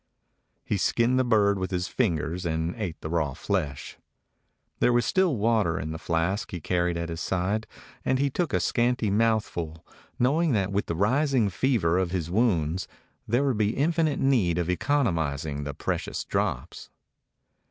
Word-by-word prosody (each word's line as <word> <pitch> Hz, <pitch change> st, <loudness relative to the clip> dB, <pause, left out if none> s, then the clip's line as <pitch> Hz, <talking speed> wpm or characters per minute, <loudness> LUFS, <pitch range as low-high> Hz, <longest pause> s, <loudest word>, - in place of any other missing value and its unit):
He 105 Hz, -, 0 dB
skinned 120 Hz, +6 st, +2 dB
the -, -, +4 dB
bird 105 Hz, -4 st, +3 dB
with 95 Hz, -, -2 dB
his 90 Hz, 0 st, -2 dB
fingers 90 Hz, -, -1 dB
and 80 Hz, 0 st, -1 dB
ate 95 Hz, -8 st, -4 dB
the 80 Hz, -, -5 dB
raw 80 Hz, -5 st, 0 dB
flesh. 80 Hz, -9 st, -3 dB, 0.8 s
There -, -, +4 dB
was 120 Hz, -1 st, +2 dB
still 185 Hz, -6 st, +2 dB
water 105 Hz, -6 st, +2 dB
in 80 Hz, +2 st, -4 dB
the 80 Hz, -, -5 dB
flask 85 Hz, +6 st, -1 dB
he 90 Hz, -, -5 dB
carried 85 Hz, +1 st, 0 dB
at 85 Hz, 0 st, -3 dB
his 80 Hz, 0 st, -5 dB
side, 95 Hz, +6 st, -1 dB, 0.4 s
and 130 Hz, -, +1 dB
he 140 Hz, +1 st, +1 dB
took 170 Hz, 0 st, -1 dB
a -, -, +2 dB
scanty 120 Hz, -3 st, +1 dB
mouthful, 100 Hz, -7 st, 0 dB, 0.3 s
knowing 150 Hz, +5 st, +2 dB
that 100 Hz, -2 st, 0 dB
with 100 Hz, +1 st, -1 dB
the 85 Hz, -, -2 dB
ris 130 Hz, -, +2 dB
ing 110 Hz, -5 st, +3 dB
fever 95 Hz, -6 st, +1 dB
of 95 Hz, -2 st, 0 dB
his 85 Hz, -2 st, -3 dB
wounds 90 Hz, -6 st, +1 dB, 0.4 s
there 120 Hz, +5 st, +2 dB
would 130 Hz, -6 st, 0 dB
be 105 Hz, +2 st, +1 dB
infinite 155 Hz, 0 st, +1 dB
need 110 Hz, -11 st, +2 dB
of 90 Hz, 0 st, 0 dB
economizing 80 Hz, -, 0 dB
the 70 Hz, -, -4 dB
precious -, -, -3 dB
drops. -, -, -3 dB
100 Hz, 170 wpm, -26 LUFS, 85-120 Hz, 0.8 s, the